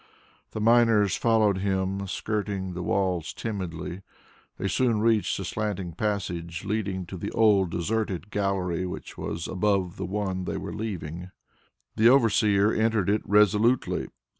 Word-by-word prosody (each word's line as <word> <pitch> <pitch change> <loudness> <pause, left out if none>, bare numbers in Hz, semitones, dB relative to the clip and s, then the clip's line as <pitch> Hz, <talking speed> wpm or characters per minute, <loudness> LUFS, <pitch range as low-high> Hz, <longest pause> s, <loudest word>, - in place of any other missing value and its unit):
The - - -3
miners 115 -3 +4
followed 110 -4 +2
him, 95 0 -1
skirting 100 -2 -3
the 90 - -5
walls 90 -3 -1
timidly. 95 -4 -5 0.6
They 100 - -2
soon 115 +1 +1
reached 110 -1 +2
the 95 - -4
slanting 100 -2 -3
passage 90 -2 -3
leading 95 -3 -2
to 95 +2 -8
the - - -4
old 100 -5 +4
deserted 95 +1 -2
gallery, 95 -3 -1
which 90 - -7
was 85 - -4
above 95 -2 0
the 95 - -4
one 95 -2 -2
they - - -3
were - - -6
leaving. 90 -5 -5 0.7
The 110 +2 +6
overseer 105 -5 +4
entered 110 -3 +1
it 105 - +1
resolutely. 105 +4 +3
100 Hz, 140 wpm, -26 LUFS, 90-110 Hz, 0.7 s, The